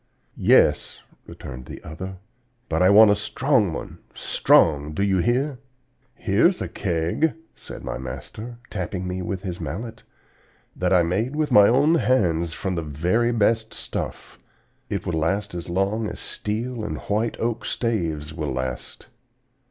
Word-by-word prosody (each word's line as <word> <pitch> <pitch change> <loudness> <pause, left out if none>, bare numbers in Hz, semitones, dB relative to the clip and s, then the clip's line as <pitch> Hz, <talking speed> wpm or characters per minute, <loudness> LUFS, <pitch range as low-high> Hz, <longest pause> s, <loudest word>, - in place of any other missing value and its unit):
"'Yes!' - - +3 0.3
returned 60 0 -9
the - - -8
other; 95 +5 -7 0.5
'but 80 +1 0
I 90 - +6
want 105 +1 +8
a - - +4
strong 110 - +1
one - - -7 0.2
strong, 75 -2 +3
do 100 - 0
you 95 -2 +2
hear?' 125 - 0 0.6
"'Here's 115 - +2
a - - -3
keg,' 85 - 0 0.2
said - - -10
my - - -4
master, 110 - -7
tapping 90 -1 -3
me 90 0 -3
with 95 +1 -4
his 90 -3 -5
mallet, 95 - -5 0.7
'that - - 0
I 90 -2 +5
made 105 - -1
with 155 -1 0
my 100 -1 +8
own 145 +6 +4
hands 85 -9 +2
from 95 +3 -3
the 85 - -1
very 90 +11 0
best 110 0 +1
stuff. - - -5 0.5
It - - -3
will 85 - -2
last 100 +6 -1
as 85 0 -6
long 100 +5 0
as - - -7
steel 115 +2 -4
and - - -3
white 110 +3 -1
oak 115 0 -1
staves 80 -10 -2
will 75 -3 -3
last.' 65 -1 -5
100 Hz, 150 wpm, -24 LUFS, 85-115 Hz, 0.7 s, want